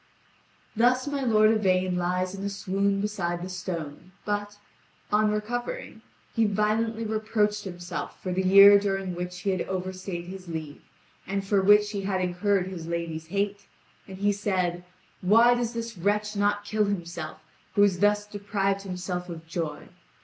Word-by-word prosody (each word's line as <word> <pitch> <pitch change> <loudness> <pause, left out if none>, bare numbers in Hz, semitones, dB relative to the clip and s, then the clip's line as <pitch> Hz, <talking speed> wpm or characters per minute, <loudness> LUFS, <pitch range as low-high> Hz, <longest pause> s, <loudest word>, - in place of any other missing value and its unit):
Thus 250 +3 +3
my 285 -1 -2
lord 215 -4 +4
Yvain 185 -4 +2
lies 180 +1 -1
in 195 0 -6
a 200 - -1
swoon 200 0 0
beside 175 -4 -2
the 185 - -5
stone, 175 -2 -6
but, 205 0 -2 0.5
on 210 +1 +3
recovering, 240 - -4 0.3
he 225 -2 +3
violently 215 +2 0
reproached 215 -1 0
himself 175 -1 -6
for 185 - -4
the 190 - +1
year 200 +2 +8
during 195 -2 -2
which 180 +1 -5
he 195 - 0
had 185 -2 -1
overstayed 185 -1 -4
his 185 0 -9
leave, 160 -3 -6 0.5
and 195 0 -2
for 195 0 +2
which 210 +1 +5
he 200 -2 -3
had 190 -1 -1
incurred 185 +1 +1
his 180 -3 -7
lady's 165 -1 -4
hate, 200 +2 -2 0.4
and 190 -1 -9
he 205 +1 +2
said: 185 -4 -1 0.4
"Why 230 +6 +6
does 240 -1 -1
this 230 -1 -5
wretch 210 +3 0
not 205 0 +1
kill 215 0 +1
himself 170 -5 -4 0.4
who 205 - +6
has 190 -3 +3
thus 205 +1 +3
deprived 200 -1 -1
himself 180 -1 -4
of 165 -1 -8
joy? 165 -2 -4
195 Hz, 160 wpm, -27 LUFS, 180-210 Hz, 0.5 s, year